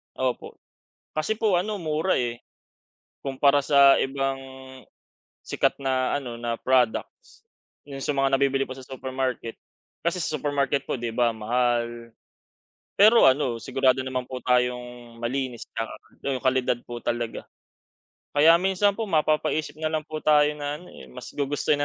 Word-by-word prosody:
Opo. 130 -1 -3 0.6
Kasi 210 +8 -1
po 210 -5 +2
ano 200 +2 -2
mura 160 +3 0
eh, 120 -1 -3 0.8
kumpara 140 +1 +3
sa 140 -2 +6
ibang 135 0 -1 1.1
sikat - - 0
na 130 -1 0
ano, 120 -4 -5
na 120 -1 -2
products. 125 -3 0 0.4
Yun 135 -1 -7
sa 145 - -1
mga 135 0 +2
nabibili 135 0 +2
po 130 - -7
sa 130 -1 -11
supermarket. 130 -3 -4 0.5
Kasi 170 +2 0
sa 155 - -2
supermarket 140 -1 0
po - - -1
'di 120 -2 -4
ba 120 -1 +1
mahal. 120 +1 -1 0.8
Pero 220 +3 +6
ano 130 -3 +3
sigurado 130 +3 +1
naman 130 -1 -3
po 130 - -5
tayong 125 -1 -1
malinis 125 0 -3
'tsaka 115 0 -5 0.4
yung 130 0 -2
kalidad 130 -2 +2
po 120 0 -7
talaga. 120 -1 -3 0.9
Kaya 160 +3 +6
minsan 195 +3 +1
po, 225 - -2
mapapaisip 155 -2 0
nalang 155 -1 -1
po 155 0 -6
tayo 150 -1 +4
na 145 0 -3
ano 180 - -14
eh, 65 - -12
mas 60 - -10
gugustuhin 145 +1 0
135 Hz, 145 wpm, -25 LUFS, 120-150 Hz, 1.1 s, sa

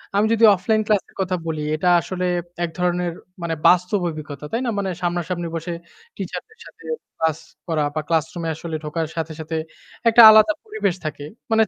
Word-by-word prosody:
আমি 205 +2 +4
যদি 230 0 +1
অফলাইন 215 +4 +1
ক্লাসের 210 -3 0
কথা 185 -1 0
বলি 155 -2 -2
এটা 160 +4 -1
আসলে 185 0 -3 0.4
এক 170 - -1
ধরনের 180 0 0 0.3
মানে 170 -1 -2
বাস্তব 180 +3 +4
অভিজ্ঞতা, 150 -2 -7
তাই 230 - -1
না? - - 0
মানে 195 -1 -1
সামনাসামনি 175 0 -2
বসে, 165 +1 -4 0.4
টিচারদের 445 0 -7
সাথে - - -16 0.3
ক্লাস 160 -1 +1 0.3
করা 160 -3 0
বা - - +1
classroom 165 +1 -1
এ - - 0
আসলে 165 0 -6
ঢোকার 160 +1 -2
সাথে, 160 -1 -3
সাথে 160 +1 -5 0.5
একটা 230 +1 +7
আলাদা 215 +8 +7
পরিবেশ 430 - -1
থাকে। 145 -2 -4 0.3
মানে 220 0 +5
175 Hz, 175 wpm, -22 LUFS, 160-200 Hz, 0.5 s, একটা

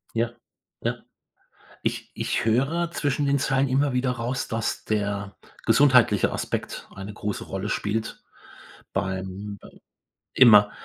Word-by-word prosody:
Ja. 115 +1 +1 0.5
Ja. - - 0 0.9
Ich - - -2
ich - - -1
höre 140 +10 +1
zwischen 145 -3 0
den 140 0 +2
Zeilen 135 0 +2
immer 135 +1 +2
wieder 125 0 +1
raus, 125 +1 -3
dass 115 0 -2
der 100 -2 -2 0.3
gesundheitliche 120 -4 +5
Aspekt - - -4
eine 95 +2 -7
große 105 -1 -4
Rolle 95 +2 -4
spielt 110 +2 -2 0.7
beim 95 +1 -3
äh, - - -15 0.6
immer. 105 -5 +8
115 Hz, 120 wpm, -25 LUFS, 100-135 Hz, 0.9 s, immer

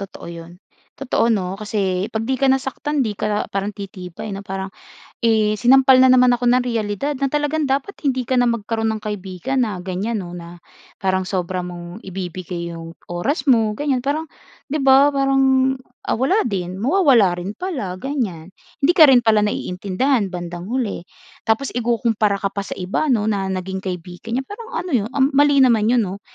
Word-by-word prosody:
totoo 190 -3 -8
‘yon. 170 +1 -10 0.4
Totoo, 260 -3 0
‘no, 195 -3 -1
kasi, 195 -3 -1
pag 220 0 -3
‘di 260 +1 -2
ka 275 - +3
nasaktan, 270 +2 0
‘di 215 - -2
ka 210 +1 -1
parang 195 +1 -1
titibay, 200 -1 -8
'no? 195 - -5
Parang, 195 -1 -6 0.5
eh, 215 -2 +3
sinampal 260 +3 +6
na 255 - +6
naman 250 0 +6
ako 245 - -5
ng 250 - +4
reyalidad 230 +5 -2
na 275 0 -1
talagang 295 +1 0
dapat, 275 +8 -1
hindi 260 -3 0
ka 260 - +1
na 245 - +4
magkaroon 225 -1 -1
ng 215 - -4
kaibigan 210 +5 -2
na 205 -5 -4
gan'yan, 195 +5 -3
‘no, 175 -1 -7
na 170 0 -10 0.4
parang 190 0 0
sobra 185 -1 -2
mong 175 +3 -9
ibibigay 180 -2 -5
‘yong 165 0 -8 0.2
oras 260 - -2
mo, 225 -4 +4
gan'yan, 260 +1 -1
parang 305 +3 -1 0.4
‘di 295 - -2
ba, 270 +1 +7
parang, 270 -1 +3 0.3
ah, - - -1
wala 275 - +2
din, 185 -4 -3
mawawala 235 - +3
rin 195 +4 -6
pala, 270 - -4
gan'yan. 190 - -4 0.3
Hindi 335 - +5
ka 320 -4 +7
rin 245 -3 +5
pala 215 -1 +4
naiintindihan 205 +4 0
bandang 175 0 -6
huli. 230 -7 -3 0.4
Tapos, 225 +5 +1
ikukumpara 230 -3 +1
ka 195 0 -3
pa 200 - -3
sa 195 - -6
iba 190 +11 -1
‘no, 230 -6 +2
na 200 -3 -1
naging 190 0 -3
kaibigan 180 +4 -5
niya, 265 - -2
parang 460 - -9
ano 365 - -6
‘yon, 220 -5 +1
um, 275 +1 +3
mali 285 +1 +4
naman 225 -4 +3
'yon, 240 -2 +3
‘no. 195 +1 -6
215 Hz, 180 wpm, -20 LUFS, 190-265 Hz, 0.5 s, ba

